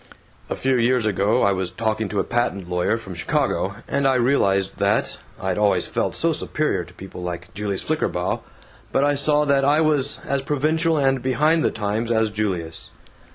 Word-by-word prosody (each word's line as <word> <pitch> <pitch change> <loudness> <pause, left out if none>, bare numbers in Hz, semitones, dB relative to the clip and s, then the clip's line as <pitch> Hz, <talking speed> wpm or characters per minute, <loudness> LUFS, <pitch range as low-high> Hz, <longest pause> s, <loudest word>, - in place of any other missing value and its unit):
"A - - -2
few 130 -1 +1
years 120 0 +2
ago 105 +3 +2
I 100 - +4
was 95 -2 -1
talking 110 +2 -2
to 105 - -1
a - - +2
patent 110 -6 -1
lawyer 90 +5 0
from 100 -5 -9
Chicago, 85 - -1
and 140 0 +1
I 135 - +3
realized 100 -7 +2
that 100 +1 +1 0.2
I'd 95 0 -1
always 100 -3 +2
felt - - -2
so - - +1
superior - - -1
to - - -15
people 95 -1 -9
like 90 -1 -6
Julius 100 0 -3
Flickerbaugh, 95 - -1 0.5
but 135 - +2
I 145 0 +3
saw 150 +1 +2
that 140 -1 +3
I 145 +3 +4
was 150 -3 +2
as 140 0 0
provincial 155 +3 +1
and 135 -2 +2
behind 150 +6 +2
the - - +3
times 110 +2 -2
as 110 -2 +2
Julius. 90 -6 -2
115 Hz, 185 wpm, -22 LUFS, 95-140 Hz, 0.5 s, I